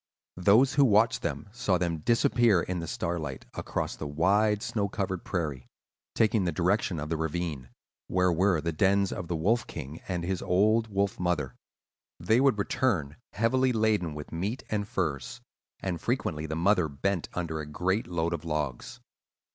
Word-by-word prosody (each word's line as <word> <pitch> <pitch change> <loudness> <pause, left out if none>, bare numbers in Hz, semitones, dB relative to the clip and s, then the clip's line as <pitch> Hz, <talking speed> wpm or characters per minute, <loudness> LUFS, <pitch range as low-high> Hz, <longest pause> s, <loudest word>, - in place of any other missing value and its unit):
Those 110 +9 +5
who 145 -1 +5
watched 115 0 +4
them 110 - -3
saw 110 -5 +1
them 85 -2 -1
disappear 115 0 +3
in 90 -1 -3
the 85 - -5
starlight, 80 -7 -3
across - - -3
the 75 - -5
wide, 100 +8 +2
snow 100 -3 -1
covered 95 -3 -3
prairie, 75 -8 -3 0.5
taking 110 -2 +3
the 85 - 0
direction 90 +1 0
of 75 +1 -5
the 80 - -1
ravine, 80 -5 -3 0.4
where 90 -1 +2
were 90 -1 +2
the 85 - -1
dens 95 +4 +2
of 90 - -5
the 85 - -2
Wolf 105 +8 +1
King 70 +5 -7
and 90 -2 -2
his 90 +1 -2
old 110 +5 +3
wolf 100 +1 -1
mother. 80 -8 -1 0.7
They 110 +9 +3
would 135 -5 +4
return 100 - 0 0.2
heavily 130 +4 +2
laden 110 -8 +1
with 75 -1 -8
meat 100 +10 -3
and 105 -1 -1
furs; 75 -10 -3 0.4
and 90 -4 -3
frequently 75 +1 -1
the 80 - -3
mother 90 0 +3
bent 85 +6 -2
under 80 -3 -2
a 75 - -5
great 95 +8 -1
load 85 -1 -1
of 85 - -4
logs. 75 -6 -3
90 Hz, 170 wpm, -28 LUFS, 80-105 Hz, 0.7 s, Those